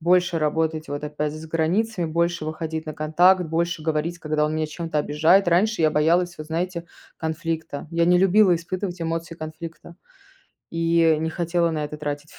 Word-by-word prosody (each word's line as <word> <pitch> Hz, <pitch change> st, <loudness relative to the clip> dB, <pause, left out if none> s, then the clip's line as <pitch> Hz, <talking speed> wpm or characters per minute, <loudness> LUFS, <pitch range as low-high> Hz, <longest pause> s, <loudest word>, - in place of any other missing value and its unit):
больше 180 Hz, +1 st, +3 dB
работать 155 Hz, +1 st, -1 dB
вот 145 Hz, +1 st, -4 dB
опять 150 Hz, 0 st, -3 dB
с 160 Hz, +1 st, -8 dB
границами, 175 Hz, +4 st, 0 dB
больше 170 Hz, 0 st, 0 dB
выходить 160 Hz, 0 st, -4 dB
на 155 Hz, -, -5 dB
контакт, 175 Hz, +5 st, +4 dB
больше 170 Hz, 0 st, -2 dB
говорить, 160 Hz, +2 st, -1 dB
когда 155 Hz, -1 st, 0 dB
он 155 Hz, -, -2 dB
меня 155 Hz, 0 st, -1 dB
чем-то 160 Hz, -1 st, -3 dB
обижает. 160 Hz, +6 st, +3 dB
Раньше 185 Hz, +2 st, +2 dB
я 155 Hz, -, +4 dB
боялась, 170 Hz, +4 st, +2 dB
вот, 155 Hz, -, -7 dB
знаете, 170 Hz, +1 st, -3 dB, 0.3 s
конфликта. 160 Hz, -2 st, -4 dB
Я 170 Hz, 0 st, +2 dB
не 180 Hz, 0 st, +5 dB
любила 195 Hz, 0 st, +5 dB
испытывать 180 Hz, +2 st, -4 dB
эмоции 165 Hz, 0 st, -3 dB
конфликта 165 Hz, +2 st, -9 dB, 0.7 s
и 165 Hz, -1 st, +3 dB
не 160 Hz, 0 st, -1 dB
хотела 170 Hz, 0 st, 0 dB
на 155 Hz, -2 st, -2 dB
это 150 Hz, +1 st, -6 dB
тратить, 145 Hz, 0 st, -5 dB
165 Hz, 170 wpm, -23 LUFS, 155-175 Hz, 0.7 s, не